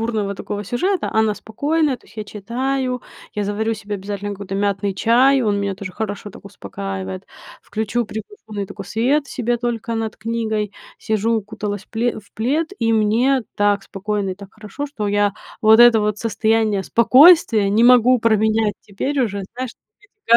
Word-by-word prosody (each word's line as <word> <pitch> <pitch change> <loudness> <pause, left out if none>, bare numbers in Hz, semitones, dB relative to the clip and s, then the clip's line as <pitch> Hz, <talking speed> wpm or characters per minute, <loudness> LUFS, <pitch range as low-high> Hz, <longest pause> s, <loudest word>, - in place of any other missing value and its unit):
бурного 215 -3 -1
такого 205 0 -5
сюжета, 360 - -1
а - - -1
она 220 -1 +3
спокойная, 285 +6 -1
то - - -25
есть - - -20
я 215 - -3
читаю, 250 +5 -3 0.3
я 210 - -1
заварю 220 +2 -1
себе 210 -1 -5
обязательно 205 +1 -5
какой-то 195 -1 -6
мятный 200 -1 0
чай, 250 +6 +4
он 205 -2 +1
меня 200 -1 -2
тоже 190 -1 -7
хорошо 205 0 -5
так - - -14
успокаивает, 95 - -6 0.3
включу 220 +2 -2
приглушенный 215 - -7
такой 200 0 -9
свет 270 +9 +1
себе 240 -4 -1
только 230 -1 -3
над 225 -1 -3
книгой, 220 -2 -2 0.3
сижу, 220 +1 0
укуталась 210 -1 -4
в - - -41
пле 235 +2 -1
в - - -26
плед, 290 +9 0
и 225 -1 +1
мне 230 +5 +2
так 205 -1 +2
спокойно 200 0 -3
и - - -4
так 200 0 -13
хорошо, 220 +7 -6
что 215 -8 -4
я 205 -1 +2 0.3
вот 220 +1 +6
это 240 -2 +8
вот 210 0 0
состояние 220 -3 +1
спокойствия 250 - +6
не 220 +3 +3
могу 250 0 +6
променять 220 -1 +2
теперь 265 +8 -3
уже, 200 -4 -1
знаешь, 255 -2 -3
на - - -71 0.5
вот 235 - +8
220 Hz, 175 wpm, -20 LUFS, 205-240 Hz, 0.5 s, это